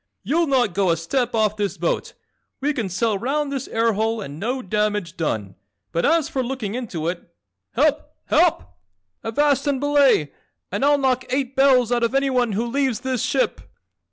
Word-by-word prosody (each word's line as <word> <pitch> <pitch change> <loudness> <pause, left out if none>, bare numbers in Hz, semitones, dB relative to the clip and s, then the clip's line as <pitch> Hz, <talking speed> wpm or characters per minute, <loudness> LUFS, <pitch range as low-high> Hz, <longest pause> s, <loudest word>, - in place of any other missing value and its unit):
"You'll 330 +3 +1
not 250 -8 +2
go 195 -1 +1
a 165 - +2
step 245 +9 -1
off 215 -1 +1
this 200 -3 -2
boat. 170 0 -2 0.5
We 290 +2 0
can 225 -8 -3
sail 205 +2 0
round 280 +5 -1
this 275 -3 -3
air 225 0 +1
hole 220 +2 0
and 150 -7 -7
no 250 +6 -2
damage 210 -4 -1
done, 110 - -2 0.4
but 170 - +1
as 325 -1 +3
for 265 - -2
looking 240 -5 -4
into 200 -10 -4
it! 175 0 -4 0.4
Help, - - +1 0.2
HELP! 90 - +3 0.6
Avast 280 +4 +1
and 280 -2 +1
belay 280 - +3 0.4
and 200 +7 -2
I'll 290 +1 +5
knock 260 -2 +1
eight 265 0 -1
bells 260 -3 +4
out 240 -1 +2
of 235 +3 0
anyone 255 -5 +1
who 225 +4 -1
leaves 255 -1 0
this 260 -2 -1
ship!" 265 - 0
240 Hz, 180 wpm, -22 LUFS, 200-270 Hz, 0.6 s, I'll